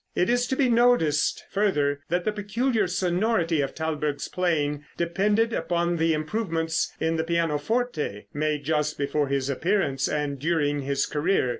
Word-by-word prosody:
It 180 - +2
is 245 0 +2
to 265 - -1
be 265 -1 +2
noticed, 235 -12 +3
further, 150 -9 +1
that 175 +1 0
the 215 - +2
peculiar 215 +1 0
sonority 180 -2 +1
of 135 - -3
Thalberg's 150 -2 -2
playing 150 -5 0
depended 205 +7 +1
upon 175 -2 0
the 165 0 +2
improvements 165 -1 -1
in 160 0 0
the 160 - 0
pianoforte, 165 - -1
made 150 0 -1
just 150 0 0
before 145 +1 0
his 135 -1 -1
appearance 140 -2 0
and 145 -2 -2
during 145 -1 +1
his 140 0 0
career. 150 -2 +1
165 Hz, 150 wpm, -25 LUFS, 145-200 Hz, -, noticed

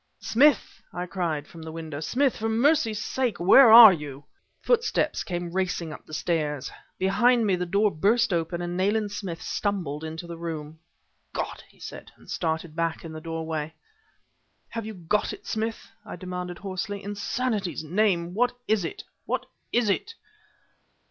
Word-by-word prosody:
"Smith!" 275 +2 +2
I 180 0 -4
cried 170 -5 -2
from 165 +1 -12
the 160 0 -7
window; 160 -3 -6
"Smith, 260 - +1
for 225 +1 -2
mercy's 230 -2 +2
sake 250 +1 -1
where 220 +7 +8
are 225 -3 +12
you?" 145 -3 -7 0.4
Footsteps 475 -1 +1
came 175 -1 -4
racing 180 -4 -1
up - - -12
the 155 - -12
stairs. 150 -5 -1 0.3
Behind 230 +5 +3
me 195 -3 +3
the 180 0 -3
door 200 +3 +2
burst 205 +6 +2
open 170 +1 -1
and 175 0 -3
Nayland 205 +3 +1
Smith 185 -5 -5
stumbled 175 -8 -2
into 160 +2 -6
the 170 -1 -8
room. 160 -2 -6 0.5
"God!" - - -4
he - - -25
said, - - -9
and - - -13
started 160 -1 -2
back 165 0 -2
in 160 - -7
the 155 - -7
doorway. 160 -1 -4 0.9
"Have 230 -2 -5
you 220 - -6
got 180 +4 -1
it, - - -11
Smith?" 220 +1 -3
I - - -8
demanded 180 -1 -5
hoarsely. 200 +1 -5
"In 205 +1 -4
sanity's 205 - -2
name 175 0 +1
what 245 +4 +2
is 215 -3 +2
it 165 - -5 0.2
what - - -1 0.3
is 240 -2 +2
it?" 435 - -1
180 Hz, 165 wpm, -26 LUFS, 165-220 Hz, 0.9 s, are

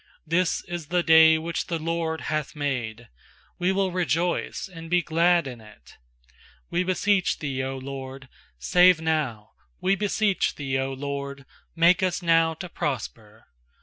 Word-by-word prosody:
24This 170 +2 +1
is 175 -3 -5
the 175 +1 +1
day 160 -1 +7
which 165 +1 -3
the 170 - -2
LORD 165 0 -2
hath 155 +1 -3
made; 120 -6 -3 0.5
We 180 +1 +2
will 190 -1 0
rejoice 175 0 -1
and 165 -3 -10
be 175 0 +2
glad 170 +1 +3
in 125 -4 -8
it. 105 -1 -17 0.8
25We 180 +1 0
beseech 190 0 +1
Thee, 140 -3 -4
0 135 0 -3
LORD, 135 0 -8 0.3
save 180 - +5
now! 150 -10 -2 0.3
We 195 +1 +2
beseech 205 0 0
Thee, 135 -2 -5
0 135 0 -1
LORD, 140 0 -5 0.3
make 170 +2 +4
us 185 0 -1
now 165 -1 +3
to 180 +3 -7
prosper! 115 -8 -5
160 Hz, 150 wpm, -25 LUFS, 135-175 Hz, 0.8 s, day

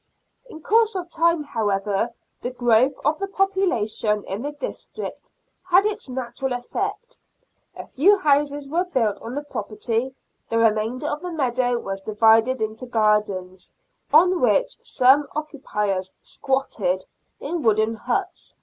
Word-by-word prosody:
In 315 -7 -11
course 450 0 +3
of 350 -2 -5
time, 335 -1 +2
how 225 -7 -2
ever, 200 +3 0 0.3
the 245 - -2
growth 245 +1 +3
of 310 +2 +1
the 395 - -2
population 300 - 0
in 195 +3 -5
the 290 +3 -3
district 430 +5 -6 0.3
had 370 +2 +4
its 425 -7 -3
natural 255 +1 -3
effect. 245 0 -4 0.6
A - - -8
few 390 +10 +4
houses 290 -4 +1
were 335 +5 +1
built 230 - 0
on 235 +3 -6
the 290 - -3
property; 230 +1 -3 0.3
the 230 - 0
remainder 225 +4 +1
of 300 0 -2
the 360 - -5
meadow 250 -5 0
was 195 -4 -5
divided 225 +4 +3
into 220 +3 -5
gardens, 210 -5 0 0.4
on 355 +4 +5
which - - +2
some 270 +3 +3
occupiers 210 - -3
" - - -50
squatted 210 -9 -1 0.2
" - - -48
in 330 +3 -3
wooden 220 -2 +2
huts 250 - -3
255 Hz, 145 wpm, -23 LUFS, 220-315 Hz, 0.6 s, on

